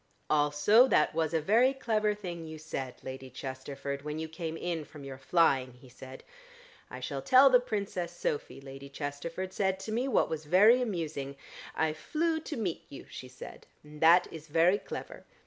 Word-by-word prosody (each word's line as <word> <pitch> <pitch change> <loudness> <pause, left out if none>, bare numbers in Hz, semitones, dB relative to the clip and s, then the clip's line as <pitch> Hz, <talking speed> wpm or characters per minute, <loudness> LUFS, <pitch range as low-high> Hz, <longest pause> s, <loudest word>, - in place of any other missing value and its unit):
"Also 150 - +5
that 155 - +3
was 160 -1 0
a 165 - +1
very 230 - +3
clever 215 -5 0
thing 175 -5 -6
you 160 -1 -8
said, 135 -5 -5
Lady 130 0 -7
Chesterford, 135 +2 -6
when 150 +1 -5
you 160 0 -4
came 160 0 -5
in 170 -2 -3
from 150 -1 -12
your 135 -1 -8
flying," 135 -4 +2
he 125 +1 -17
said. 130 +1 -11 0.7
"I - - -8
shall - - -4
tell 265 +1 +6
the 250 - +7
Princess 200 -7 -3
Sophy, 150 -5 -3
Lady 135 0 -10
Chesterford 160 +6 -5
said 190 -1 0
to 215 - -6
me 240 +4 0
what 270 - +2
was 155 -1 -5
very 210 +10 +6
amusing. 160 - -3 0.4
'I 160 -1 +1
flew 320 - -1
to 310 -2 -6
meet 190 -7 -3
you,' 140 - -10
she 130 - -8
said, 125 0 -11 0.2
and 150 0 -13
that 170 +2 +7
is 160 -1 -9
very 170 +6 +3
clever. - - -8
160 Hz, 180 wpm, -30 LUFS, 140-205 Hz, 0.7 s, the